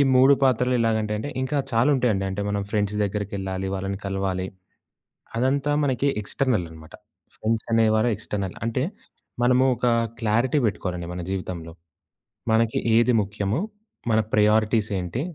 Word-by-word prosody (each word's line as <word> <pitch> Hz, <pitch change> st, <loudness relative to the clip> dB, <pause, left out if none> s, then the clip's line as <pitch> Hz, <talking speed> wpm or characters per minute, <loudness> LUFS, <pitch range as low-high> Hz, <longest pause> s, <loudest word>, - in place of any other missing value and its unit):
3 130 Hz, +2 st, +7 dB
పాత్రలు 125 Hz, -1 st, +3 dB
ఎలాగంటే 110 Hz, -2 st, +1 dB
అంటే 110 Hz, -, -4 dB
అండి, 130 Hz, -, -5 dB
ఇంకా 145 Hz, +2 st, -1 dB
చాలా 115 Hz, +5 st, +3 dB
ఉంటాయండి. 115 Hz, -7 st, +1 dB
అంటే 95 Hz, +2 st, -3 dB
మనం 100 Hz, 0 st, -1 dB
ఫ్రెండ్స్ 105 Hz, -1 st, 0 dB
దగ్గరికెళ్ళాలి, 95 Hz, -2 st, -3 dB
వాళ్ళని 95 Hz, +1 st, -3 dB
కలవాలి. 95 Hz, -1 st, -2 dB, 0.9 s
అదంతా 135 Hz, +4 st, +1 dB
మనకి 135 Hz, -1 st, +1 dB
ఎక్స్‌ట్రనల‌నమాట. 90 Hz, -10 st, -2 dB, 0.4 s
ఫ్రెండ్స్ 110 Hz, 0 st, -1 dB
అనేవారు 110 Hz, 0 st, +3 dB
ఎక్స్‌ట్రనల్. 100 Hz, -2 st, -4 dB
అంటే 115 Hz, +3 st, 0 dB, 0.6 s
మనము 125 Hz, +1 st, +4 dB
ఒక 125 Hz, +1 st, -1 dB, 0.3 s
క్లారిటీ 115 Hz, +5 st, +1 dB
పెట్టుకోవాలండి 90 Hz, -5 st, -2 dB
మన 90 Hz, -, -4 dB
జీవితంలో. 90 Hz, -4 st, -5 dB, 0.8 s
మనకి 115 Hz, 0 st, +2 dB, 0.2 s
ఏది 120 Hz, +2 st, +4 dB
ముఖ్యమో, 100 Hz, +3 st, -2 dB, 0.5 s
మన 110 Hz, -, +4 dB
ప్రయారిటీస్ 110 Hz, +1 st, +3 dB
ఏంటి, 90 Hz, +8 st, -3 dB
110 Hz, 130 wpm, -24 LUFS, 95-120 Hz, 0.9 s, 3